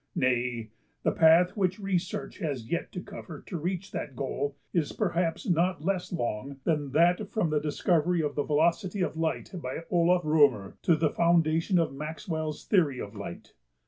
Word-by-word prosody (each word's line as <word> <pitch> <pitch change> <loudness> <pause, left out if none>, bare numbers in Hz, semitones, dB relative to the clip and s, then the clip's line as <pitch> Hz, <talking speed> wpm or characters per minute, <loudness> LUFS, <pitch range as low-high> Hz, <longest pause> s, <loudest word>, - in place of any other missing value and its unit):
Nay, 120 -3 0 0.3
the - - +3
path 165 +3 +5
which 185 -3 +1
research 195 +1 -2
has 140 - -3
yet 170 - -2
to 180 - -4
cover 190 -6 -9
to 185 - -7
reach 180 +4 -3
that 135 - -5
goal 140 +2 -3 0.2
is 160 -5 0
perhaps 175 0 -1
not 175 -2 +1
less 185 -1 -1
long 135 -3 -3
than 150 -4 0
that 175 +6 +3
from 185 -8 0
the 150 - +2
discovery 165 +2 +1
of 145 -1 -1
the 145 - 0
velocity 170 +6 +1
of 160 -3 -1
light 160 0 -2
by 130 +5 -5
Olaf 175 0 +3
R\"{o}mer 145 -11 +3
to 170 - +4
the 155 -1 +1
foundation 170 +1 +3
of 165 -5 +1
Maxwell's 155 +1 -4
theory 155 - +2
of 100 +2 -7
light. 100 -4 -8
165 Hz, 170 wpm, -28 LUFS, 145-180 Hz, 0.3 s, path